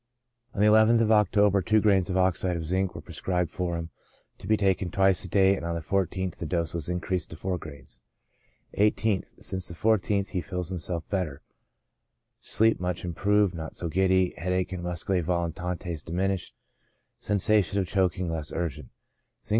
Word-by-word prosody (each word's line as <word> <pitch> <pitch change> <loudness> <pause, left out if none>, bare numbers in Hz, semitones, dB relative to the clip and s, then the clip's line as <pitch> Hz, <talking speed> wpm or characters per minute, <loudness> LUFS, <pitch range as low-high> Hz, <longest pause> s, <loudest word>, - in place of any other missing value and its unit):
TREATMENT. 120 0 -37
I - - -11 0.2
I3 110 - +7
On 110 - +4
the 115 - +4
nth 115 - +4
of 110 -1 +2
October, 105 -1 +4
two 110 +4 +3
grains 100 -4 +3
of 95 - 0
oxide 90 -1 +1
of 80 - -5
zinc 95 +3 -1
were - - -6
prescribed 90 -3 -2
for 85 -2 -2
him, 85 0 -6 0.5
to - - -10
be 110 +1 +3
taken 95 -2 +1
twice 95 0 +2
a - - -6
day, 95 +1 +4
and - - -7
on 85 0 -2
the - - -2
14th 95 +1 -1
the 85 - -5
dose 85 -1 -1
was 85 -1 -3
increased 90 -1 -2
to - - -8
four 90 +2 -3
grains. 70 -5 -11 0.7
1 105 +1 +4
8th. 105 -3 -2
— - - -37
Since 95 -1 0
the 85 - -6
14th, 100 -2 +1
feels 90 -2 -4
himself 85 -2 -4
better, 85 -8 -3 1.0
sleep 110 +1 +2
much 90 0 -3
improved, 100 +3 +2
not 80 -2 -7
so 85 - -4
giddy; 95 +1 +2
headache 90 +2 -1
and 90 -2 -4
muscse 90 -1 -4
volitantes 90 -2 -2
diminished; 95 +3 -2 0.6
sensation 100 0 +1
of 95 - +1
choking 95 -1 0
less 80 -2 -4
urgent. 85 -4 -4 0.6
Zinc. - - -8
90 Hz, 185 wpm, -27 LUFS, 85-100 Hz, 1.0 s, I3